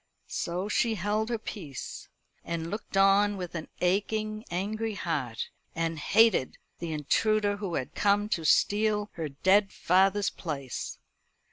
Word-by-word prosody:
So 180 +3 -3
she 225 +1 +1
held 210 +3 -1
her 235 - 0
peace, 165 - -7 0.4
and 165 0 -4
looked 205 -1 -4
on 200 +1 +5
with 180 -2 -5
an 165 -2 -5
aching 215 +4 0
angry 215 +5 -2
heart, 140 - -2 0.3
and 165 -1 -1
hated 225 - +3 0.2
the 170 -1 -4
intruder 205 +7 +1
who 195 -4 -3
had 130 - -3
come 205 0 +2
to 165 - -1
steal 210 +4 +2
her 160 -3 -4
dead 190 +8 +3
father's 195 +3 +3
place. 140 -7 -5
195 Hz, 135 wpm, -29 LUFS, 165-210 Hz, 0.4 s, on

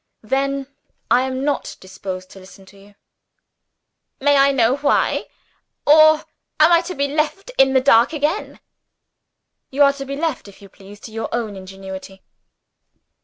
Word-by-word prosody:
"Then 275 +4 -1 0.5
I 255 +2 +3
am 260 0 -4
not 290 -2 -3
disposed 185 0 -8
to 195 - -13
listen 190 +1 -16
to 200 +1 -19
you." 200 +1 -19 1.2
"May 285 +1 +3
I 275 0 +5
know 250 0 +2
why? 285 0 0 0.6
or 310 +1 +6 0.3
am 310 +2 +6
I 340 0 +5
to 365 - -5
be 280 0 0
left 310 - -2
in 270 0 +5
the 260 - +4
dark 240 -2 +4
again?" 305 +5 -3 1.1
"You 280 +2 +2
are 280 0 +4
to 275 -1 -7
be 275 +1 -5
left, 300 -6 -3
if 200 - -15
you 200 - -15
please, 200 +2 -15
to 225 - -10
your 225 +1 -5
own 225 -4 -3
ingenuity." 190 0 -10
265 Hz, 160 wpm, -20 LUFS, 200-285 Hz, 1.2 s, or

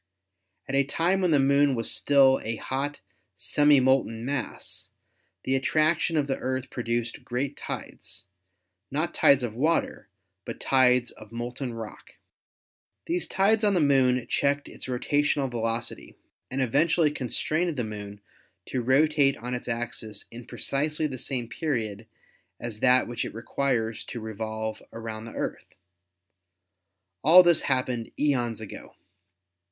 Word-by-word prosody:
At 135 - -5
a 140 0 +4
time 170 +7 +1
when 180 - +2
the 155 - +4
Moon 140 0 +3
was 115 -1 -1
still 135 -2 +4
a 115 +1 -2
hot, 140 +4 -4 0.3
semi 145 -1 +4
molten 125 -3 +1
mass, 140 -1 -5 0.5
the 130 - 0
attraction 155 +4 +2
of 145 - +2
the 135 -1 -2
Earth 130 0 -3
produced 120 -1 -3
great 135 +3 -3
tides, - - -7 0.6
not - - -1
tides 140 -2 +4
of 115 -3 -3
water, 155 +2 0 0.3
but - - -7
tides 125 -2 +3
of 110 0 -14
molten 120 +1 -5
rock. 110 -2 -9 0.9
These 350 +2 -1
tides 210 +3 +2
on 205 -2 +3
the - - +3
Moon 130 -4 +3
checked 140 +2 0
its - - -8
rotational 140 +1 0
velocity 115 0 -3 0.3
and 130 +1 -1
eventually 155 +5 +2
constrained 155 +5 0
the 125 - 0
Moon 105 -1 -7 0.5
to 130 - -1
rotate 140 +2 +3
on 125 +2 -5
its 125 - -4
axis 115 -3 -4
in 120 +1 -10
precisely 150 +3 -1
the 130 -4 -4
same 125 -3 -3
period 115 -8 -3 0.5
as 115 -3 -6
that 125 +1 +4
which 120 -1 -3
it - - -7
requires 115 -1 -1
to 120 - -6
revolve 110 0 -4
around 110 -1 -6
the 115 - -10
Earth. - - -5 1.5
All 175 +5 +9
this 175 -2 +4
happened 125 -3 -1
eons 120 -6 0
ago. 110 -2 -10
130 Hz, 140 wpm, -27 LUFS, 115-145 Hz, 1.5 s, All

